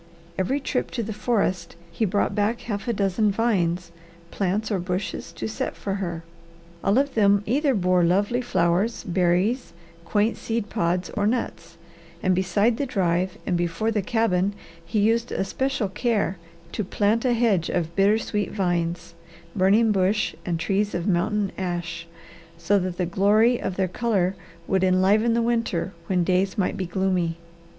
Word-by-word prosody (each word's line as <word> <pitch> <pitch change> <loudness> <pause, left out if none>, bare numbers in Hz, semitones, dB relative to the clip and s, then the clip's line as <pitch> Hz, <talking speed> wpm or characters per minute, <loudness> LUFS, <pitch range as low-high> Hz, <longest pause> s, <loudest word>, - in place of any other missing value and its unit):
Every 190 +11 0
trip 265 -2 -2
to 235 - 0
the 220 +1 -4
forest 195 -6 -1 0.2
he 220 +6 0
brought 205 +1 0
back 210 +3 0
a - - -14
half 210 0 -4
dozen 200 +2 +1
vines, 180 -6 0 0.4
plants, 205 +3 -1
or 195 - +1
bushes 180 +2 -3
to - - -4
set 220 - -3
for 195 - -4
her. 170 -3 -4 0.6
All 200 +4 +3
of 280 0 +1
them 205 -2 +4
either 275 +3 +2
bore 180 -2 +2
lovely 205 +8 +2
flowers, 185 +1 +1
berries, 185 +7 +1 0.3
quaint 210 +5 +1
seed 225 -2 -3
pods, 180 -3 0
or 205 -1 0
nuts, 225 -7 -3 0.5
and 185 - +3
beside 195 +5 +2
the 280 - -1
drive 185 -4 0
and 180 - 0
before 175 +6 0
the 210 -2 0
cabin 200 -2 +1 0.3
he 215 - -3
used 230 +3 +2
especial 255 +3 -1
care 205 -3 -1 0.3
to 215 - -2
plant 210 +4 +1
a 250 -2 +2
hedge 220 -8 +2
of 170 -1 -2
bittersweet 205 +1 +1
vines, 175 -3 -1 0.4
burning 205 +4 +4
bush, 200 +2 +1
and 170 -2 -1
trees 200 +4 0
of 175 0 -2
mountain 200 +2 +1
ash, 175 -2 -4 0.5
so 190 +5 +2
that 180 -1 -3
the 180 - 0
glory 210 +7 +3
of 190 - -3
their 190 -1 +1
colour 195 -2 0 0.3
would 190 -1 +1
enliven 195 +5 +3
the 235 - +2
winter 230 -6 -1
when 180 -2 +2
days 185 +2 +1
might 190 - 0
be 185 -3 -3
gloomy. 180 -2 0
195 Hz, 160 wpm, -24 LUFS, 180-220 Hz, 0.6 s, them